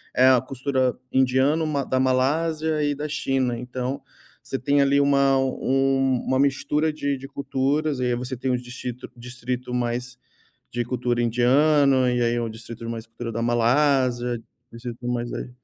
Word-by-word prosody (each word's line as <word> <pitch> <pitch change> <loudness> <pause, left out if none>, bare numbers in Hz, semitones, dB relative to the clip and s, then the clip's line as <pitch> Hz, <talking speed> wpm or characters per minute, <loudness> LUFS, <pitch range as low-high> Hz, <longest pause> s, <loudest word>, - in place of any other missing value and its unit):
é 130 +1 +6
a 130 -2 +6
cultura 130 -1 -1 0.2
indiana, 130 +5 +2
ma 140 -2 -1
da 130 0 0
Malásia 155 +4 +1
e 145 0 +1
da 150 +2 -4
China. 130 -4 -1
Então 125 +2 -4 0.4
você 135 - -3
tem 140 +2 +2
ali 140 +1 +3
uma 140 -1 +3
um 135 0 +1
uma 130 0 +1
mistura 145 +3 +1
de 140 -2 -1
de 135 +1 -9
culturas. 140 +1 -1
E 125 - 0
aí 120 -1 +1
você 125 +1 -4
tem 130 +1 -2
um - - +2
distrito 125 0 -7
distrito 125 +1 -5
mais 125 +1 -2 0.5
de 120 0 -2
cultura 120 -1 -1
indiana, 130 +2 +3
e 120 - 0
aí 120 0 +2
é 120 - -1
um 115 - -3
distrito 115 +1 -9
mais 115 0 -5
cultura 115 0 -7
da 115 - -2
Malásia, 120 0 +2 0.3
distrito 120 +1 -7
mais 120 -1 -2
aí - - -5
130 Hz, 170 wpm, -24 LUFS, 120-140 Hz, 0.5 s, é